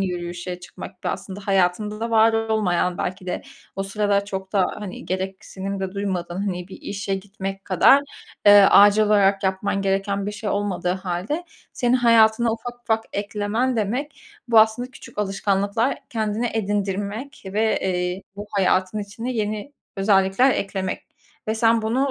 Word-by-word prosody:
yürüyüşe 175 -1 -4
çıkmak 180 +1 -11
ve - - 0
aslında 195 +1 -5
hayatında 195 +2 +1
da 230 +1 -2
var 225 0 +5
olmayan 215 -6 0
belki 185 +1 -4
de 180 - -3 0.3
o 195 - -1
sırada 200 0 0
çok 190 -1 -6
da, 195 -3 +3
hani, 200 -3 -7
gereksinim 190 +1 -4
de 190 -1 -3
duymadığın. 185 -3 -3
Hani, 180 -1 -4
bir - - -9
işe 200 -1 -3
gitmek 195 0 -6
kadar, 200 +9 +5 0.4
eee, 205 0 +9
acil 205 +1 +7
olarak 200 -2 +3
yapman 195 +1 0
gereken 195 +1 0
bir 205 - -3
şey 205 0 -4
olmadığı 200 -3 -1
hâlde 190 - -3 0.3
senin 245 0 +1
hayatına 230 -1 +4
ufak 240 +1 -7
ufak 225 -1 0
eklemen 210 +5 -1
demek, 245 +8 -2 0.3
bu 230 -1 +6
aslında 220 +3 +1
küçük 215 -3 -13
alışkanlıklar 200 +4 0
kendine 220 +1 -1
edindirmek 205 +4 -2
ve, 215 +3 +1
eee, 180 0 -1
bu 205 - -6
hayatın 190 0 +1
içine 220 +5 -5
yeni 215 +3 -3 0.2
özellikler 195 +5 +3
eklemek. 195 -4 -3 0.4
Ve 220 - +1
sen 225 0 +3
bunu, 255 +6 +1
200 Hz, 150 wpm, -23 LUFS, 190-220 Hz, 0.4 s, eee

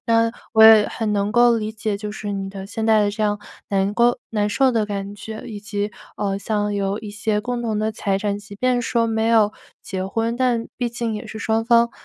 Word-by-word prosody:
那 230 0 +3 0.2
我 220 - +7
也 220 -2 +8
很 215 -2 -2
能 200 0 0
够 240 +1 +5
理 215 0 -3
解， 215 -2 -3
就 210 0 -5
是 205 -1 -5
你 195 -1 -3
的 195 0 -8
现 220 +2 -3
在 220 -1 +5
的 205 - +1
这 215 +1 -4
样 205 -1 +1 0.3
难 195 0 +1
过 240 +2 +3
难 210 -2 0
受 260 +4 +2
的 220 -3 +1
感 200 0 -4
觉， 220 +1 -8
以 210 -3 -7
及， 205 0 -3 0.2
呃， 195 -1 -1
像 210 0 -1
有 200 0 -1
一 215 -2 -7
些 215 0 -1
共 245 -1 -3
同 220 -3 -1
的 215 0 -1
财 200 -2 -1
产， 205 0 -2
即 205 -1 -12
便 250 +1 +1
说 235 -1 +1
没 225 0 0
有 220 -2 +4 0.3
结 190 -1 -4
婚， 225 +3 -1
但 240 -2 +1
毕 245 - 0
竟 235 -1 -3
也 210 - -6
是 220 - -7
双 225 0 0
方， 235 0 +4
215 Hz, 250 characters per minute, -21 LUFS, 205-230 Hz, 0.3 s, 也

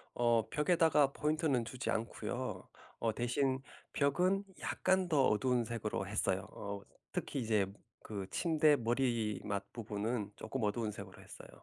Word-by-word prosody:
어 120 -2 +3
벽에다가 150 -2 +4
포인트는 150 -4 +1
주지 125 +4 -3
않고요. 120 +2 -3 0.3
어 115 -2 +1
대신 130 +3 +1 0.3
벽은 180 +8 +2 0.2
약간 185 -1 +1
더 145 -5 +4
어두운색으로 115 -3 0
했어요. 100 -1 0
어 100 0 -5 0.3
특히 140 - -2
이제 110 -4 +2 0.4
그 100 -3 -5
침대 155 -3 +4
머리맡 115 -5 -1
부분은 105 -1 -3
쪼끔 115 +2 -4
어두운색으로 105 -3 -3
했어요. - - -11
120 Hz, 290 characters per minute, -35 LUFS, 105-140 Hz, 0.4 s, 벽에다가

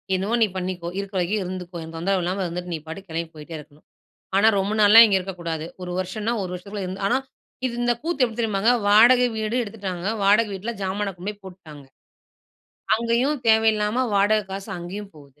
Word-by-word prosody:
என்னமோ 195 +5 0
நீ 220 - +5
பண்ணிக்கோ, 180 -2 -4
இருக்கிற 195 -1 -5
வரைக்கும் 195 +4 0
இருந்துக்கோ. 180 -1 -6
எனக்கு 165 0 -9
தொந்தரவு 190 +3 0
இல்லாம 185 +3 -2
இருந்துட்டு, 175 +1 -5
நீ - - -5
பாட்டுக்கு 190 +4 -9
கிளம்பி 165 0 -3
போயிட்டே 155 +2 -9
இருக்கணும். 150 0 -17 0.5
ஆனா, 215 - +5
ரொம்ப 195 +2 -1
நாள்லாம் 215 +3 +9
இங்க 200 -2 +3
இருக்கக்கூடாது. 170 -4 -5 0.2
1 180 - -5
வருஷம்னா, 210 +5 -2
1 185 - -5
வருஷத்துக்குள்ளே 195 +1 -6
இருந்து 190 +2 -6
ஆனா - - +3 0.5
இது 250 - -1
இந்த 240 0 +2
கூத்து 320 -3 0
எப்டி 230 -2 -1
தெரியுமாங்க? 220 0 +2 0.2
வாடக 240 +5 +7
வீடு 220 +1 -2
எடுத்துட்டாங்க. 195 -4 -5 0.2
வாடக 210 +3 +4
வீட்ல 200 +5 -4
ஜாமான 195 +1 -2
கொண்டு 180 +4 -5
போய் 205 -1 -18
போட்டுட்டாங்க. 165 -6 -12 1.1
அங்கயும் 235 +5 0
தேவயில்லாம 220 +2 +3
வாடக 205 +1 +3
காசு 195 +2 -6
அங்கயும் 195 +4 -7
போகுது. 145 -1 -18
195 Hz, 180 wpm, -23 LUFS, 180-215 Hz, 1.1 s, நாள்லாம்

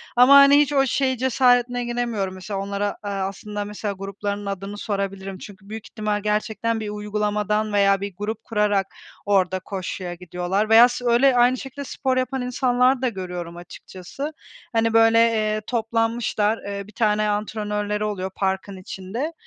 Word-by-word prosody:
ama, 250 +3 +7
hani, 280 +1 +8
hiç 295 0 +2
o 270 -1 +4
şey 260 0 0
cesaretine 245 -1 +2
giremiyorum 235 -5 -2
mesela 190 +2 -5
onlara, 200 +1 -2
eee, - - -2 0.2
aslında 205 +2 -5
mesela 205 0 -4
gruplarının 200 +1 -4
adını 200 +1 -5
sorabilirim. 195 -2 -4
Çünkü 195 0 -13
büyük 220 0 -7
ihtimal 210 -2 -2
gerçekten 220 +2 -1
bir 215 - -4
uygulamadan 210 0 -1
veya 200 -1 +3
bir 200 -2 -5
grup 210 +2 -4
kurarak 205 -3 +1 0.4
orada 190 -2 +2
koşuya 185 -1 -5
gidiyorlar 180 +4 -2
veya 230 +2 +8
s 245 0 -5
öyle 245 +3 +4
aynı 245 +1 +4
şekilde 270 +2 -7
spor 260 -1 -2
yapan 255 +1 -1
insanlar 250 +1 +2
da 255 - +1
görüyorum 180 -4 -6
açıkçası. 185 - -8 0.4
Hani, 225 0 +2
böyle, 225 0 +5
eee, 215 -2 +2
toplanmışlar, 225 -2 0
eee, 200 0 -5
bir - - -14
tane 210 -1 +1
antrenörleri 210 0 -2
oluyor 190 -2 -3
parkın 190 0 -2
içinde. 195 - -5
210 Hz, 155 wpm, -23 LUFS, 200-240 Hz, 0.4 s, hani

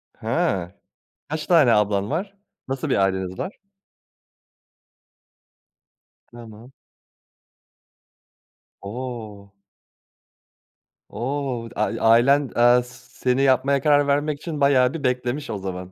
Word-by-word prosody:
Ha. 90 -2 -1 0.6
Kaç 155 0 -4
tane 155 -9 +5
ablan 100 0 +1
var? 195 +6 -3 0.3
Nasıl 135 -1 -3
bir - - +2
aileniz 95 -1 -1
var? 185 - -5 2.7
Tamam. 115 +1 -13 2.1
O! 110 -2 -7 1.6
O! 130 -2 -3
Dı - - -16
a 110 +1 +1
ailen, 135 +4 +4
eee, 120 +1 +5
s 125 +1 -17
seni 130 +1 +1
yapmaya 135 +1 +2
karar 145 0 +3
vermek 145 +1 0
için 155 -4 -6
bayağı 130 -1 +4
bir 155 -3 -6
beklemiş 125 +2 -2
o 105 - -3
zaman. 95 -1 -6
125 Hz, 100 wpm, -22 LUFS, 105-140 Hz, 2.7 s, tane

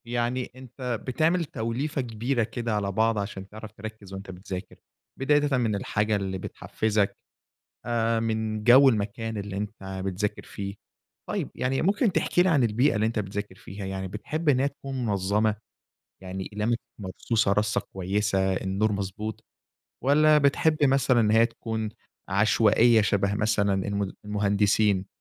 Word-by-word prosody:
يعني 120 +1 -2
أنت 125 -2 -5
بتعمل 165 +6 +2
توليفة 135 +4 -2
كبيرة 120 +1 -1
كده 115 0 -3
على 100 -1 -1
بعض 110 +2 +2
عشان 100 -1 -5
تعرف 110 0 -9
تركِّز 110 -2 -9
وأنت 95 0 -7
بتذاكر، 90 0 -7 0.4
بدايةً 145 0 +2
من 115 -4 +1
الحاجة 105 +2 0
اللي 95 -2 -2
بتحفزك، 105 +2 -1 0.7
آآ، 115 -1 +1
من 110 -1 -2
جو 130 +4 +8
المكان 110 0 -2
اللي 100 -1 -5
أنت 100 -2 -5
بتذاكر 95 +2 -2
فيه. 100 0 -6 0.5
طيب، - - -2
يعني 130 +1 0
ممكن 205 +5 +2
تحكي 175 - +2
لي 185 - +3
عن 145 -7 +3
البيئة 120 +5 +2
اللي 105 +1 +1
أنت 115 0 0
بتذاكر 100 -1 -4
فيها؟ 100 +1 -8
يعني 95 0 -4
بتحب 150 - -2
إن 130 -3 +4
هي 135 - +2
تكون 135 -2 -5
منظمة؟ 105 +1 +1 0.7
يعني 95 0 -5
أقلامك 110 +3 0 0.2
مرصوصة 100 +2 0
رصة 105 +1 +1
كويسة، 95 0 0
النور 100 +3 0
مضبوط؟ 100 +2 -4 0.6
والّا 150 +2 +5
بتحب 150 +2 +3
مثلًا 130 -3 +3
إن 105 -2 +3
هي 115 +1 +5
تكون 110 -2 -4 0.4
عشوائية 110 +3 +4
شبه 100 -1 +1
مثلًا 105 -2 +1
الم 100 -1 -2
المهندسين؟ 100 -1 +2
110 Hz, 145 wpm, -26 LUFS, 100-120 Hz, 0.7 s, جو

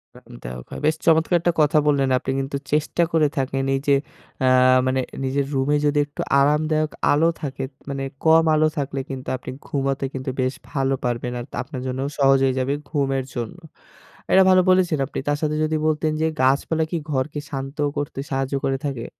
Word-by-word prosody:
আরামদায়ক - - -10
হয় - - -6
বেশ 155 +1 +3
চমৎকার 165 +2 +4
একটা 175 0 +1
কথা 150 +1 +3
বললেন 140 -2 +2
আপনি 135 - -3
কিন্তু 135 +1 -3
চেষ্টা 155 +3 +1
করে 160 -2 +3
থাকেন 135 0 -1
এই - - 0
যে 140 - +5 0.5
আ - - +4 0.4
মানে 130 0 +1 0.2
নিজের 135 +1 0
রুমে 135 +2 +1
যদি 145 0 +2
একটু 145 - -7 0.2
আরামদায়ক 155 +2 +1 0.2
আলো 160 +3 +4
থাকে, 135 -3 -4 0.3
মানে 135 -1 -3 0.2
কম 160 0 +6
আলো 155 0 +4
থাকলে 140 -1 -2
কিন্তু 130 -2 -6
আপনি 130 - -8 0.2
ঘুমাতে 135 -1 -1
কিন্তু 130 0 -4
বেশ 130 +1 0 0.2
ভালো 135 -1 0
পারবেন 120 0 -2
আর 120 - -6 0.2
আপনার 130 0 -7
জন্য 130 0 -3 0.2
সহজ 135 -1 +5
হয়ে 130 -1 +2
যাবে 130 +2 0 0.2
ঘুমের 135 -3 0
জন্য। 120 +6 -4 0.7
এটা 190 - +7
ভালো 185 0 +6
বলেছেন, 185 -4 +3
আপনি - - -5
তার 145 0 +1
সাথে 155 -1 0
যদি 155 0 0
বলতেন 155 0 +1
যে 160 - +3
গাছপালা 140 +5 +2
কি 170 - 0
ঘরকে 145 +2 -1
শান্ত 135 +1 -5 0.2
করতে 145 -1 -3
সাহায্য 135 0 -2
করে 135 0 0
থাকে? 130 -5 -3
140 Hz, 185 wpm, -22 LUFS, 135-155 Hz, 0.7 s, এটা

